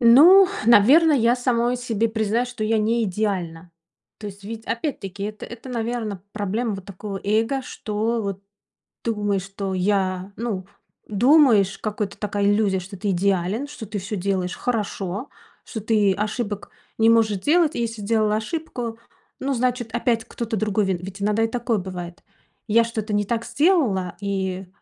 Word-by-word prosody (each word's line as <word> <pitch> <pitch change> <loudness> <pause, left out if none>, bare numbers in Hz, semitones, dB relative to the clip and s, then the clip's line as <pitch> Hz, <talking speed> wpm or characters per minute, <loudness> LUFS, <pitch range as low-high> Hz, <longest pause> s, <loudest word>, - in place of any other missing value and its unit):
Ну, 325 +12 +8 0.2
наверно, 265 +9 +7
я 240 -3 +4
самой 245 -1 +1
себе 230 -2 -1
признаюсь, 220 +2 0
что 240 -3 -4
я 220 +1 +2
не 225 +2 +1
идеальна. 180 -4 -2 0.5
То 210 - -7
есть, 200 0 -9
ведь, 225 +2 -7
опять-таки, 225 -6 -4
это, 215 0 -6
это 235 +2 -10
наверно, 225 -5 -3
проблема 210 +2 -2
вот 195 -1 -8
такого 200 0 -7
эго, 225 +6 +1
что 225 -1 -2
вот 195 -1 -4 0.6
думаешь, 205 -4 0
что 195 0 -5
я, 185 0 0
ну, 215 -5 -3 0.4
думаешь, 220 -3 +4
какой-то 210 -2 -3
такая 205 -1 -1
иллюзия, 205 -2 +2
что 190 +2 -9
ты 200 +2 -1
идеален, 195 +6 0
что 290 -6 -8
ты 210 0 -4
всё 195 +3 -5
делаешь 185 -1 -1
хорошо, 210 -1 -3 0.4
что 220 - -6
ты 210 -2 +3
ошибок 210 +1 -3 0.3
не 225 0 +5
можешь 220 -3 +3
делать, 320 - +3
и - - -1
если 225 -2 -3
сделала 215 0 +1
ошибку, 240 -2 -4 0.4
ну, 275 +1 -1
значит, 245 -2 -1
опять 235 -1 0
кто-то 230 -1 -4
другой 210 0 +1
ви 190 - +1
Ведь 195 +2 -8
иногда 210 +2 +2
и - - +3
такое 235 -1 -1
бывает. 180 -2 -7 0.4
Я 230 +2 +5
что-то 220 -2 -4
не 205 0 +2
так 230 +2 -2
сделала, 265 - +2
и 190 -2 -2
215 Hz, 160 wpm, -23 LUFS, 195-235 Hz, 0.6 s, Ну